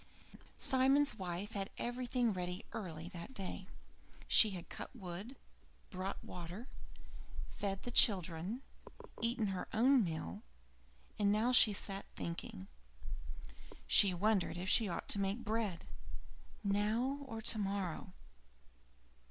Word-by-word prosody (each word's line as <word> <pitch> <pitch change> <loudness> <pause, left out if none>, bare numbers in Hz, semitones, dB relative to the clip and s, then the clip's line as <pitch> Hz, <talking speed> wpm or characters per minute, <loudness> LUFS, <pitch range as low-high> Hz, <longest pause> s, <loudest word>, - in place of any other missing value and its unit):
III - - -15 0.2
Simon's 270 +1 +3
wife 185 +3 -4
had 195 -1 -3
everything 245 -1 0
ready 180 +1 -4
early 165 -5 -5
that 180 +7 -9
day. 190 -2 -5 0.6
She 220 - +8
had 180 -4 -7
cut - - -6
wood, 195 +4 -7 0.6
brought 190 0 -4
water, 180 +7 -7 0.8
fed 195 -1 -4
the 245 - -5
children, 190 +2 +3 0.6
eaten 230 -2 0
her 190 -1 -3
own 250 +2 +5
meal, 160 - -4 0.8
and 205 -1 +3
now 220 +4 +2
she 230 -3 +7
sat 200 -1 -2
thinking. 170 - -5 1.2
She 200 - +8
wondered 190 0 +1
when 180 - -4
she 205 +2 +5
ought 170 - -4
to 200 - +5
make 200 +4 -1
bread: 215 -5 -2 0.8
now 215 +7 +1
or 225 -3 -5
tomorrow? 195 -5 -1
200 Hz, 120 wpm, -36 LUFS, 180-230 Hz, 1.2 s, She